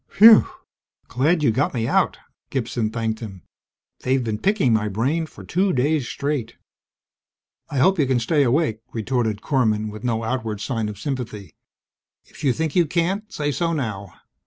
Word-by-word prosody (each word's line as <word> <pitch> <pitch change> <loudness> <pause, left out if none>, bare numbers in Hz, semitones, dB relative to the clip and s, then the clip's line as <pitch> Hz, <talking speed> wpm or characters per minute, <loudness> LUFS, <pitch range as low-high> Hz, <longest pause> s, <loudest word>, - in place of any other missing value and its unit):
"Whew! 220 +1 +9 0.6
Glad 150 +6 +1
you 140 - +4
got 135 +4 0
me 115 -2 0
out!" - - +2 0.3
Gibson 120 -3 -2
thanked 110 -1 -2
him. 95 -6 -9 0.6
"They've 130 0 0
been 110 -2 -3
picking 190 - +2
my 110 -1 +1
brain 135 +11 -1
for - - -13
two 190 +2 +1
days 140 0 +1
straight!" 140 -5 -3 1.1
"I 140 - -4
hope 190 +7 +3
you 140 - +3
can 130 -2 +2
stay 145 +6 +1
awake," 130 -3 +1
retorted 110 -2 -1
Korman 110 -6 0
with 110 +2 -10
no 115 -2 -1
outward 110 -3 -3
sign 110 -2 -2
of 105 - -8
sympathy. 110 - -5 0.7
"If - - -15
you 135 - +3
think 160 +2 -2
you 175 -3 +4
can't, 185 +7 -1
say 145 -1 -2
so 170 +3 -1
now. 105 - -4
125 Hz, 165 wpm, -22 LUFS, 110-150 Hz, 1.1 s, Whew